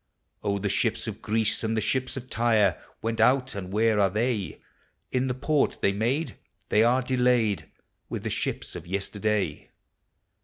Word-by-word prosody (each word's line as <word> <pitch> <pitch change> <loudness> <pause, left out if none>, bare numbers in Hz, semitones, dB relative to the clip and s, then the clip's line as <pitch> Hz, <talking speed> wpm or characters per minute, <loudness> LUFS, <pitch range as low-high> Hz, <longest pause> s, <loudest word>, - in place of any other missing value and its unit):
Oh, 100 -1 +1
the 100 +1 -2
ships - - 0
of - - -6
Greece 110 0 0
and 110 0 0
the - - +4
ships 130 +5 -1
of 130 -1 -6
Tyre 110 -7 +2 0.2
Went 115 0 0
out, 130 0 +3
and 95 -2 -6
where 110 +1 +3
are 100 -1 +4
the.\? 105 -3 -1 0.5
In 130 0 +1
the 125 - -1
port 145 +2 +1
they 100 - +3
made, 120 +10 -1 0.3
they 105 - +4
are 125 +3 +3
delayed 125 -5 +2 0.4
With - - -4
the - - -2
shi{>s - - -3
of 85 - -8
yesterday. 100 -2 -1
110 Hz, 165 wpm, -27 LUFS, 100-125 Hz, 0.5 s, the